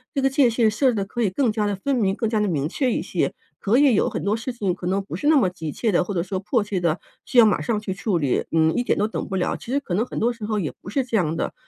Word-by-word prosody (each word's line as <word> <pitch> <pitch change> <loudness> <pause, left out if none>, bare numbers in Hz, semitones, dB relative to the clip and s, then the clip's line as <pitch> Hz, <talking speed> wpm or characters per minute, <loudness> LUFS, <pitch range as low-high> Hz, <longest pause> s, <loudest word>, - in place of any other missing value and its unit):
这 - - +1
个 270 0 +2
界 270 -3 +4
限 225 -1 +2
设 260 +6 +2
置 245 - 0
得 200 -2 -1
可 240 +4 -4
以 215 - +2
更 235 +5 +1
加 210 -1 -1
得 205 - -1
分 270 +9 -1
明， 195 -5 +1
更 225 - -1
加 220 0 0
得 210 - +1
明 150 -6 0
确 255 - 0
一 - - 0
些， - - -1 0.3
可 210 +4 +2
以 280 -2 +5
有 210 - +2
很 - - -4
多 200 +2 +1
事 230 +3 -4
情 205 -7 -1
可 180 0 -6
能 195 +2 0
不 195 - -7
是 295 - -2
那 315 - +6
么 230 -9 +4
急 165 -4 -5
切 220 - -1
地， 180 - +3
或 180 - -6
者 170 - 0
说 190 +1 -3
迫 215 +3 0
切 205 -2 -2
地 170 -2 +1 0.3
需 255 - -3
要 235 - +9
马 215 - +2
上 225 -3 -1
去 210 -3 -4
处 190 0 -1
理， 140 -6 0
嗯， 160 0 +3
一 - - +1
点 - - 0
都 210 - +1
等 220 - -4
不 190 - -4
了。 180 - 0
其 235 - -9
实 280 - +2
可 270 - -6
能 205 +5 +2
很 - - -5
多 240 +2 +1
时 230 -2 -12
候 215 0 -1
也 160 -7 -3
不 - - -9
是 265 +6 0
这 235 -3 -1
样 165 -5 0
的， - - -2
210 Hz, 365 characters per minute, -23 LUFS, 185-240 Hz, 0.3 s, 要